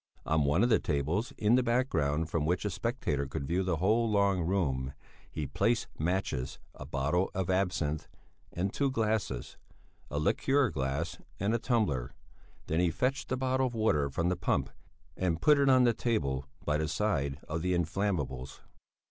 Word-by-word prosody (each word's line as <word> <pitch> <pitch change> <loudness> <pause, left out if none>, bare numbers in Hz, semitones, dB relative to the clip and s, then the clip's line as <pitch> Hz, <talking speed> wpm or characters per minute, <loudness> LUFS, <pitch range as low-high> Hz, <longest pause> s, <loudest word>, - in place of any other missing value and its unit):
On 80 -2 +2
one 75 +9 +3
of 120 - +3
the 110 - +5
tables, 75 - -1
in 105 +2 +3
the 130 - +5
background, 100 - +1
from 80 -1 -1
which 90 +6 0
a 105 - 0
spectator 90 - -2
could 70 +1 -4
view 85 +6 0
the 90 -3 0
whole 110 +8 +2
long 100 -3 +2
room, 70 -8 0 0.4
he 80 -2 -4
placed 110 - +1
matches, 75 -6 -1 0.2
a - - -9
bottle 75 +7 0
of 95 -1 0
absinth 90 -5 0 0.4
and 95 +3 -2
two 140 -1 +1
glasses, 110 - -1 0.5
a 75 - -3
liqueur 135 - +2
glass 70 +4 -2 0.2
and 100 +3 +1
a 115 - +1
tumbler; 80 - 0 0.5
then 80 - 0
he 90 -1 +3
fetched 125 +13 -1
a 130 - +1
bottle 130 0 +1
of 120 - -6
water 75 -11 +2
from 85 +6 0
the 90 - +1
pump 90 - 0 0.4
and 85 -3 0
put 150 - +5
it 140 -1 +4
on 130 -1 +6
the 120 -1 +4
table 70 - -1 0.2
by 75 0 +1
the 80 - 0
side 70 -7 0
of 80 +1 -2
the 90 +1 +1
inflammables. 85 -7 -2
90 Hz, 175 wpm, -31 LUFS, 75-110 Hz, 0.5 s, on